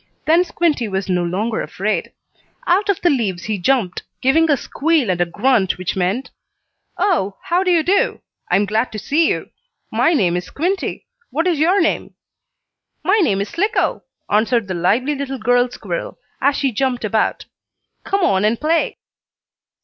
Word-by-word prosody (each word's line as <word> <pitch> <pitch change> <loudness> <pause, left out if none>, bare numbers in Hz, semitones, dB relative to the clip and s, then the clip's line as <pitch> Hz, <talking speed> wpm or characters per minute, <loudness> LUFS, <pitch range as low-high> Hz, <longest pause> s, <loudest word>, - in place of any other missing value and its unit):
Then 330 +3 +4
Squinty 330 -9 0
was 190 -1 -3
no 180 -1 +1
longer 205 +6 -1
afraid. 210 +3 -2 0.5
Out 385 +4 +2
of 400 - +2
the 350 - +4
leaves 200 -10 -1
he 210 -2 -2
jumped, 195 -3 +1 0.2
giving 320 +5 +3
a 285 - +4
squeal 290 - 0
and 175 -1 -1
a 175 - +2
grunt 205 +1 +1
which 185 -1 -3
meant: 190 +8 -1 0.7
"Oh, 345 - 0
how 350 +2 +1
do 380 - 0
you 340 -3 +3
do? 385 +5 +1 0.3
I 180 - +3
am 200 +2 +3
glad 220 +4 0
to - - -4
see 295 +10 +2
you. - - -3 0.4
My 335 - +3
name 180 - +2
is 180 0 -2
Squinty. 365 +6 -2 0.2
What 330 +5 -1
is 345 -5 +1
your 355 +6 +3
name?" 335 - 0 0.9
"My 405 +4 +3
name 195 - +2
is 200 - -3
Slicko," 395 +6 0 0.3
answered 220 +1 +1
the 190 - -3
lively 225 - +1
little 275 -1 -4
girl 245 +2 +2
squirrel, - - -5 0.2
as 280 0 +3
she 275 -2 0
jumped 250 0 -1
about. 215 +1 0 0.6
"Come 395 0 0
on 195 - +2
and 220 +2 +1
play!" 325 +2 0
250 Hz, 170 wpm, -19 LUFS, 200-330 Hz, 0.9 s, Then